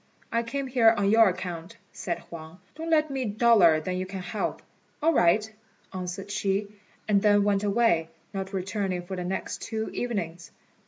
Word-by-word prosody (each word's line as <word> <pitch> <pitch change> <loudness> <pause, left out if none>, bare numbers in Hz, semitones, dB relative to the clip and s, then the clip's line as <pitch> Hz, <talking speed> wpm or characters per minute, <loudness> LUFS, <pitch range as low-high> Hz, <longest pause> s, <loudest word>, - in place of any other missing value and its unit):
"I 230 - +1
came 275 +4 -3
here 250 -3 +5
on 200 0 +2
your 225 -1 +6
account," 180 +2 -6
said 170 -2 -3
Huang; 160 0 -10 0.2
"don't 325 +1 -6
let 310 -2 +3
me 265 -1 -2
be 210 -4 -4
duller 215 -9 +5
than 180 +4 -3
you 185 0 -3
can 190 -1 -6
help." 210 +4 -3 0.4
"All 325 +2 +3
right," 210 - +3 0.5
answered 185 +2 -5
she, 200 0 -1 0.4
and 205 -2 +3
then 205 -1 +4
went 200 0 +1
away, 200 -6 +2 0.2
not 195 -1 -4
returning 190 -1 -2
for 190 +2 -6
the 180 - -4
next 185 +2 -4
two 220 -1 -3
evenings. 175 -8 -4
200 Hz, 175 wpm, -27 LUFS, 180-225 Hz, 0.5 s, your